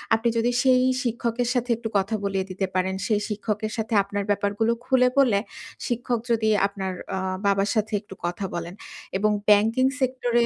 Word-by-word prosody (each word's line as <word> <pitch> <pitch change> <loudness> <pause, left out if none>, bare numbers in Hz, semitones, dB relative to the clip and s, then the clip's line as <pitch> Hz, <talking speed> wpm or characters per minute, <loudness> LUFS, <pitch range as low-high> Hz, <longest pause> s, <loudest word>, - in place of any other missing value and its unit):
আপনি 225 +1 +1
যদি 235 +1 +2
সেই 255 -1 +5 0.2
শিক্ষকের 235 0 -1
সাথে 245 -1 -1
একটু 230 -1 -5
কথা 200 +3 0
বলিয়ে 195 -1 -1
দিতে 190 +1 -2
পারেন। 185 +1 0
সেই 210 -2 +1
শিক্ষকের 215 +1 -2
সাথে 220 0 -2
আপনার 200 +1 -3
ব্যাপারগুলো 205 +2 +1
খুলে 255 -1 +4
বলে 240 -8 +4 0.5
শিক্ষক 240 -1 -1
যদি 220 -1 +2 0.2
আপনার 190 -2 -4 0.2
অ - - -2 0.3
বাবার 200 0 +2
সাথে 215 0 0
একটু 205 -2 -12
কথা 175 +3 -3
বলেন। 170 0 -4 0.4
এবং 215 +2 +2 0.2
ব্যাংকিং 220 +5 +4 0.2
সেক্টরে 245 -2 +1
220 Hz, 165 wpm, -24 LUFS, 200-240 Hz, 0.5 s, সেই